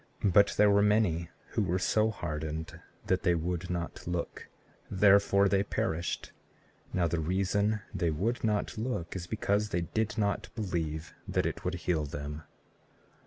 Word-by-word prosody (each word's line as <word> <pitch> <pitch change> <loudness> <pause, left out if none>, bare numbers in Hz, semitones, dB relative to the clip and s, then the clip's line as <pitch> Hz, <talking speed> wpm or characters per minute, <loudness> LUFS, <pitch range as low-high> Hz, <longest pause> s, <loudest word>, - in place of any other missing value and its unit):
But 100 +1 +5
there 105 -1 +6
were 100 0 +5
many 100 -6 +2 0.2
who - - 0
were 90 - +1
so 110 +4 +2
hardened 80 -4 -4 0.3
that 95 0 +1
they 90 -2 +3
would 90 +2 -2
not 85 -2 -4
look, 90 -1 -3 0.4
therefore 100 0 +5
they 95 0 +3
perished. 85 -4 -2 0.6
Now 90 -2 +1
the 85 +1 -1
reason 100 +5 +1
they 85 - 0
would 100 +11 -1
not 105 -1 0
look 110 -9 -3
is 85 -2 -5
because 105 +1 0
they 85 - 0
did 110 +6 -2
not 100 -2 0
believe 80 -7 -3
that - - 0
it - - -3
would 90 0 -1
heal 85 -3 0
them. 75 +1 -6
90 Hz, 155 wpm, -30 LUFS, 85-105 Hz, 0.6 s, there